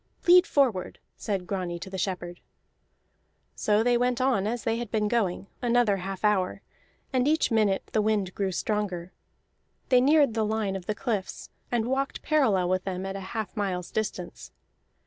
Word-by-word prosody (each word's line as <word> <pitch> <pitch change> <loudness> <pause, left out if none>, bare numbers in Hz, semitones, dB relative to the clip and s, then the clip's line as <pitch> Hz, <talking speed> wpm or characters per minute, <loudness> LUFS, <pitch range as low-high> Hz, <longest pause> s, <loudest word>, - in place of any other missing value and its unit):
"Lead 360 +2 +7
forward!" 245 -10 +1 0.2
said 195 -4 -3
Grani 180 -3 -3
to 185 - -8
the 190 - -4
shepherd. 175 -2 -3 1.1
So 210 +1 +2
they 240 0 +3
went 245 0 +1
on 250 -6 +2
as 235 +2 -3
they 225 0 0
had 240 -2 -4
been 215 -1 0
going, 205 -5 0 0.2
another 240 -4 +3
half 190 +2 -4
hour, 195 -3 +1 0.5
and 255 +1 +2
each 315 -3 +2
minute 210 -4 +2
the 215 - +3
wind 205 -3 0
grew 195 -2 -1
stronger. 185 -2 -2 0.8
They 250 -1 +5
neared 285 -2 +4
the 220 -1 0
line 215 -2 -1
of 185 -2 -7
the 215 - -1
cliffs, 210 -5 -4 0.2
and 235 -2 +1
walked 270 +2 -2
parallel 235 - +2
with 185 0 0
them 190 -1 -4
at 195 0 -4
a - - -4 0.2
half 220 -2 -3
mile's 185 -4 -2
distance. 200 -5 -4
210 Hz, 170 wpm, -27 LUFS, 190-240 Hz, 1.1 s, Lead